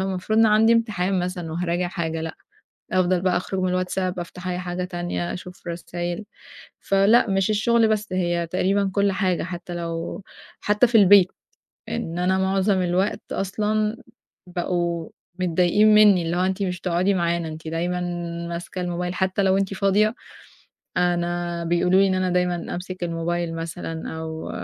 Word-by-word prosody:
أنا -, -, 0 dB
المفروض 195 Hz, +3 st, -1 dB
إن 225 Hz, -, +6 dB
عندي 220 Hz, +2 st, +5 dB
امتحان 195 Hz, -5 st, 0 dB
مثلًا 180 Hz, -2 st, -4 dB
وهاراجع 175 Hz, +1 st, -1 dB
حاجة، 165 Hz, -3 st, -3 dB
لأ، 160 Hz, 0 st, -5 dB, 0.6 s
أفضل 185 Hz, -1 st, +2 dB
بقى 180 Hz, -1 st, +2 dB
أخرج 190 Hz, +1 st, -3 dB
من 185 Hz, -, +1 dB
الواتساب، 185 Hz, 0 st, -1 dB
أفتح 175 Hz, +1 st, -7 dB
أي 180 Hz, 0 st, -2 dB
حاجة 180 Hz, 0 st, -3 dB
تانية، 175 Hz, -1 st, -3 dB
أشوف 180 Hz, 0 st, -9 dB
رسايل 175 Hz, +3 st, -4 dB, 0.5 s
فلأ، 200 Hz, +4 st, +4 dB
مش 195 Hz, 0 st, +1 dB
الشُغل 225 Hz, +2 st, +3 dB
بس 215 Hz, -1 st, 0 dB
هي 175 Hz, -2 st, 0 dB
تقريبًا 195 Hz, +3 st, +1 dB
كُلّ 200 Hz, 0 st, +2 dB
حاجة 190 Hz, -2 st, 0 dB
حتى 175 Hz, 0 st, -6 dB
لو 170 Hz, +2 st, -4 dB, 0.4 s
حتى 210 Hz, +4 st, +3 dB
في 230 Hz, -, -3 dB
البيت 200 Hz, -3 st, +7 dB, 0.6 s
إن 175 Hz, -7 st, -3 dB
أنا 185 Hz, +1 st, +2 dB
مُعظم 190 Hz, 0 st, +2 dB
الوقت 180 Hz, +3 st, 0 dB
أصلًا 210 Hz, +3 st, -1 dB, 0.6 s
بقوا 175 Hz, -2 st, -1 dB, 0.3 s
متضايقين 185 Hz, +4 st, +4 dB
منّي 205 Hz, -4 st, +6 dB
اللي 165 Hz, +2 st, -1 dB
هو -, -, +1 dB
أنتِ 190 Hz, +1 st, -1 dB
مش 180 Hz, -2 st, -2 dB
بتقعدي 180 Hz, +2 st, +1 dB
معانا، 170 Hz, -2 st, 0 dB
أنتِ 160 Hz, +1 st, -9 dB
دايمًا 175 Hz, +3 st, -2 dB, 0.5 s
ماسكة 175 Hz, +2 st, -5 dB
الموبايل 180 Hz, 0 st, -3 dB
حتى 190 Hz, +1 st, 0 dB
لو 190 Hz, 0 st, +3 dB
أنتِ 195 Hz, 0 st, -1 dB
فاضية، 205 Hz, +3 st, +2 dB, 0.8 s
أنا 175 Hz, -1 st, 0 dB
بيقولوا 180 Hz, +3 st, +3 dB
لي 195 Hz, -, +4 dB
إن 190 Hz, -, +1 dB
أنا 185 Hz, 0 st, 0 dB
دايمًا 180 Hz, 0 st, +1 dB, 0.2 s
أمسك 180 Hz, +1 st, -6 dB
الموبايل 170 Hz, 0 st, -2 dB
مثلًا، 165 Hz, 0 st, -5 dB
أو 160 Hz, 0 st, -6 dB
180 Hz, 160 wpm, -23 LUFS, 175-195 Hz, 0.8 s, البيت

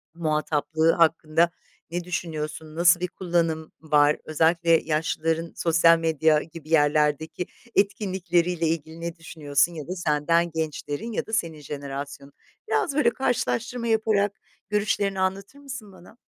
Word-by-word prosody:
muhataplığı 155 Hz, 0 st, +1 dB
hakkında 165 Hz, 0 st, +2 dB, 0.4 s
ne 175 Hz, 0 st, -2 dB
düşünüyorsun, 160 Hz, -2 st, -5 dB
nasıl 175 Hz, +1 st, +5 dB
bir 180 Hz, -, -1 dB
kullanım 165 Hz, -3 st, -1 dB
var, 150 Hz, -1 st, +3 dB
özellikle 165 Hz, +2 st, +2 dB
yaşlıların 165 Hz, +1 st, 0 dB
sosyal 165 Hz, 0 st, +4 dB
medya 160 Hz, -1 st, +2 dB
gibi 160 Hz, -1 st, -12 dB
yerlerdeki 150 Hz, +2 st, +2 dB, 0.3 s
etkinlikleriyle 180 Hz, -4 st, +1 dB
ilgili 160 Hz, 0 st, -3 dB
ne 170 Hz, 0 st, -4 dB
düşünüyorsun? 155 Hz, -1 st, 0 dB
Ya 155 Hz, -2 st, -7 dB
da 185 Hz, -, -4 dB
senden 165 Hz, +1 st, +1 dB
gençlerin 160 Hz, +5 st, -4 dB
ya -, -, -2 dB
da 220 Hz, -, -11 dB
senin 165 Hz, -7 st, -1 dB
jenerasyonun? 140 Hz, 0 st, -7 dB, 0.3 s
Biraz 285 Hz, -5 st, 0 dB
böyle 295 Hz, -5 st, +4 dB
karşılaştırma 240 Hz, -1 st, -1 dB
yaparak 215 Hz, -2 st, +2 dB, 0.4 s
görüşlerini 205 Hz, -2 st, 0 dB
anlatır 195 Hz, +8 st, -2 dB
mısın 265 Hz, -8 st, -8 dB
bana? 185 Hz, +5 st, -17 dB
165 Hz, 125 wpm, -25 LUFS, 155-185 Hz, 0.4 s, nasıl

